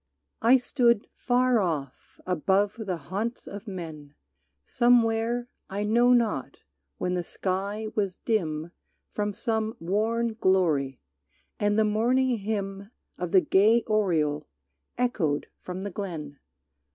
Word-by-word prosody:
I 245 Hz, +3 st, +6 dB
stood 235 Hz, -3 st, +2 dB
far 250 Hz, -1 st, +2 dB
off 155 Hz, -9 st, -4 dB
above 190 Hz, +4 st, +1 dB
the 180 Hz, -2 st, -1 dB
haunts 215 Hz, +8 st, -4 dB
of 205 Hz, +3 st, -8 dB
men 160 Hz, -6 st, -7 dB, 0.5 s
Somewhere, 240 Hz, 0 st, +2 dB, 0.2 s
I 200 Hz, +2 st, -2 dB
know 235 Hz, +4 st, +4 dB
not, 220 Hz, -, +1 dB, 0.4 s
when 180 Hz, -, -1 dB
the 180 Hz, -1 st, -1 dB
sky 200 Hz, +5 st, -3 dB
was 200 Hz, -4 st, -1 dB
dim 165 Hz, -9 st, -1 dB, 0.4 s
From 205 Hz, -1 st, -2 dB
some 220 Hz, -1 st, -1 dB
worn 220 Hz, +6 st, 0 dB
glory, 165 Hz, -, +1 dB, 0.6 s
and 205 Hz, 0 st, +2 dB
the 220 Hz, -, +4 dB
morning 240 Hz, +3 st, +2 dB
hymn 200 Hz, -1 st, -3 dB, 0.3 s
Of 180 Hz, -2 st, -3 dB
the 190 Hz, -, +6 dB
gay 220 Hz, +6 st, +4 dB
oriole 160 Hz, -8 st, +1 dB, 0.5 s
echoed 190 Hz, -, 0 dB
from 185 Hz, +1 st, -6 dB
the 200 Hz, -, -4 dB
glen. 160 Hz, -7 st, -6 dB
205 Hz, 120 wpm, -27 LUFS, 180-225 Hz, 0.6 s, I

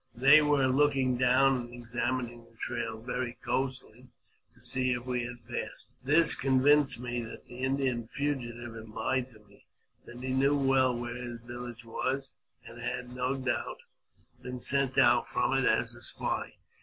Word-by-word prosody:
They 140 Hz, +6 st, +7 dB
were 145 Hz, -2 st, +3 dB
looking 135 Hz, -1 st, +2 dB
down, 130 Hz, +2 st, +4 dB
and 120 Hz, -1 st, -7 dB
examining 120 Hz, 0 st, -3 dB
tha 115 Hz, 0 st, -22 dB
trail 115 Hz, -2 st, -3 dB
very 125 Hz, +1 st, -4 dB
closely, 130 Hz, -2 st, -3 dB, 0.4 s
to -, -, -21 dB
see 130 Hz, -1 st, 0 dB
if 120 Hz, 0 st, -4 dB
we 125 Hz, -2 st, -1 dB
had 120 Hz, -1 st, -9 dB
passed. 120 Hz, -, -6 dB
This 150 Hz, +4 st, +7 dB
convinced 135 Hz, +1 st, +3 dB
me 120 Hz, -1 st, -3 dB
that 115 Hz, -, -9 dB
the 125 Hz, -, -11 dB
Indian 130 Hz, -3 st, 0 dB
fugitive 120 Hz, -4 st, -3 dB
had 110 Hz, -1 st, -10 dB
lied 125 Hz, +4 st, -1 dB
to 110 Hz, -, -17 dB
me; 100 Hz, -1 st, -23 dB, 0.4 s
that 120 Hz, +1 st, -10 dB
he 130 Hz, 0 st, -2 dB
knew 140 Hz, +2 st, +3 dB
well 135 Hz, -2 st, +3 dB
where 120 Hz, 0 st, -4 dB
his 120 Hz, -1 st, -7 dB
village 120 Hz, 0 st, -8 dB
was, 130 Hz, +4 st, -3 dB, 0.3 s
and 120 Hz, 0 st, -11 dB
had, 125 Hz, 0 st, -4 dB
no 125 Hz, +2 st, -1 dB
doubt, 130 Hz, -2 st, -2 dB, 0.6 s
been 125 Hz, 0 st, -6 dB
sent 140 Hz, +1 st, +2 dB
out -, -, +5 dB
from -, -, +1 dB
it -, -, +2 dB
as -, -, +2 dB
a -, -, -13 dB
spy. -, -, -3 dB
125 Hz, 170 wpm, -30 LUFS, 120-135 Hz, 0.6 s, They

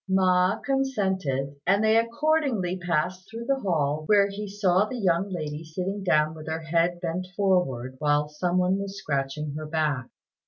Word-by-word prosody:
Ma 185 Hz, -1 st, +3 dB
consented, 190 Hz, -, -1 dB
and 200 Hz, +3 st, +4 dB
they 220 Hz, 0 st, +4 dB
accordingly 230 Hz, -, +1 dB
passed 180 Hz, +1 st, -2 dB
through 230 Hz, +2 st, -7 dB
the 275 Hz, +2 st, +1 dB
hall, 155 Hz, -, 0 dB
where 200 Hz, -1 st, +5 dB
he 205 Hz, +1 st, -5 dB
saw 195 Hz, -1 st, +2 dB
the 250 Hz, +4 st, -5 dB
young 190 Hz, -2 st, +1 dB
lady 155 Hz, -4 st, -4 dB
sitting 185 Hz, +5 st, -4 dB
down 155 Hz, -3 st, +2 dB
with 155 Hz, -1 st, -10 dB
her 160 Hz, 0 st, -3 dB
head 170 Hz, +2 st, +1 dB
bent 180 Hz, +1 st, -3 dB
forward 175 Hz, -11 st, +1 dB
while 150 Hz, 0 st, +2 dB
some 175 Hz, +4 st, -1 dB
one 185 Hz, +2 st, +2 dB
was 200 Hz, 0 st, -5 dB
scratching 140 Hz, -2 st, -2 dB
her 155 Hz, +1 st, -5 dB
back. 150 Hz, -5 st, -1 dB
180 Hz, 165 wpm, -26 LUFS, 155-200 Hz, -, where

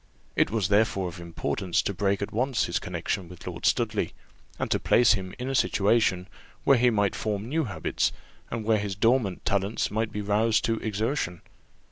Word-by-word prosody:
It -, -, +3 dB
was 105 Hz, -4 st, 0 dB
therefore 100 Hz, -3 st, +2 dB
of 85 Hz, -, -10 dB
importance 85 Hz, +1 st, -2 dB
to 100 Hz, -, -1 dB
break 100 Hz, +1 st, 0 dB
at -, -, -5 dB
once 125 Hz, +2 st, +1 dB
his -, -, -1 dB
connexion 90 Hz, -3 st, -3 dB
with 90 Hz, -1 st, -12 dB
Lord -, -, -2 dB
Studley, -, -, 0 dB, 0.4 s
and -, -, -3 dB
to -, -, +2 dB
place 120 Hz, -2 st, +5 dB
him 95 Hz, -2 st, -4 dB
in 125 Hz, -, -4 dB
a 135 Hz, -, -1 dB
situation 100 Hz, -6 st, +2 dB, 0.4 s
where 135 Hz, -3 st, +5 dB
he 125 Hz, +1 st, +5 dB
might 105 Hz, -4 st, +1 dB
form 105 Hz, 0 st, -2 dB
new 155 Hz, +4 st, 0 dB
habits, 110 Hz, -, -1 dB, 0.4 s
and 115 Hz, -1 st, -3 dB
where 110 Hz, -1 st, +3 dB
his 100 Hz, -2 st, -3 dB
dormant 115 Hz, -2 st, +1 dB
talents 100 Hz, +2 st, 0 dB
might 110 Hz, +1 st, -1 dB
be 105 Hz, -, -3 dB
roused 105 Hz, +2 st, +2 dB
to 115 Hz, -1 st, 0 dB
exertion. 110 Hz, -, -2 dB
105 Hz, 185 wpm, -27 LUFS, 95-115 Hz, 0.4 s, place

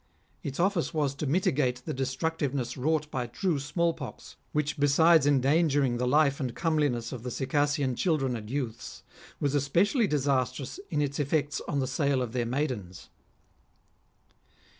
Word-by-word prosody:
Its 140 Hz, -1 st, -5 dB
ofiice 180 Hz, -2 st, 0 dB
was 145 Hz, -3 st, +1 dB
to 145 Hz, +1 st, -4 dB
mitigate 130 Hz, -6 st, +1 dB
the -, -, -3 dB
destructiveness 135 Hz, -1 st, -2 dB
wrought 150 Hz, +3 st, 0 dB
by 125 Hz, -2 st, -2 dB
true 170 Hz, +3 st, -1 dB
small 165 Hz, +4 st, 0 dB
pox, 135 Hz, -6 st, -9 dB, 0.2 s
which 150 Hz, 0 st, -1 dB
besides 150 Hz, +2 st, +5 dB
endangering 140 Hz, -2 st, +3 dB
the 125 Hz, +1 st, 0 dB
life 140 Hz, +1 st, +3 dB
and 125 Hz, -4 st, -3 dB
comeliness 145 Hz, -8 st, 0 dB
of 125 Hz, -, -6 dB
the 125 Hz, -, -5 dB
Circassian 140 Hz, +1 st, 0 dB
children 135 Hz, -5 st, 0 dB
and 105 Hz, -2 st, -7 dB
youths, 125 Hz, -4 st, -5 dB, 0.4 s
was 145 Hz, -1 st, 0 dB
especially 175 Hz, -, +2 dB
disastrous 140 Hz, -, -1 dB
in 150 Hz, -, +1 dB
its 140 Hz, 0 st, -3 dB
effects 145 Hz, +1 st, 0 dB
on 145 Hz, -, -1 dB
the -, -, 0 dB
sale 135 Hz, 0 st, +1 dB
of 120 Hz, -, -5 dB
their 120 Hz, -1 st, -1 dB
maidens. 120 Hz, -9 st, -3 dB
140 Hz, 150 wpm, -28 LUFS, 130-155 Hz, 0.4 s, besides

